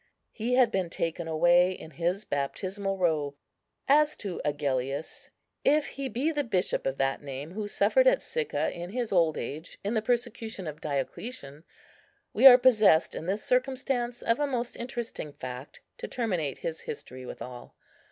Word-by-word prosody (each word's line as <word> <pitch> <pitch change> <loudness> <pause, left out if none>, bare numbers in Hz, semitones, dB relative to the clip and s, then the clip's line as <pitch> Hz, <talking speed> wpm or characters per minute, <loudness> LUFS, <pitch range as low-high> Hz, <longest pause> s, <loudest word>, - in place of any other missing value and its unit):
He 240 +2 -1
had 250 -3 +5
been 185 -3 -1
taken 165 0 -3
away 175 +3 +4
in 160 -3 -10
his 175 +6 -1
baptismal 195 +8 -2
robe. 155 -6 0 0.5
As 300 +2 +4
to 195 -4 -5
Agellius, 140 0 -2 0.3
if 300 +1 +3
he 275 -1 -5
be 255 +8 0
the 295 -2 0
bishop 185 - 0
of 135 0 -2
that 135 0 0
name 140 +2 -7
who 210 +2 -4
suffered - - +3
at - - +5
Sicca 475 -2 -2
in 175 +1 -7
his 235 +2 -3
old 165 -4 +3
age, 150 +8 -6
in 205 +3 -1
the 220 - +1
persecution 230 -4 -2
of 155 -1 -7
Diocletian, 145 - -4 0.7
we 270 - +8
are 250 -2 +11
possessed 220 -10 +5
in 165 - -6
this 200 +3 -1
circumstance 250 -1 0
of 230 +3 +2
a 290 - +1
most 245 -3 -2
interesting 235 - -5
fact 130 +1 -8 0.2
to 475 - -4
terminate 180 - -2
his 160 -1 -4
history 130 -3 -8
withal. 125 0 -9
190 Hz, 160 wpm, -28 LUFS, 150-245 Hz, 0.7 s, are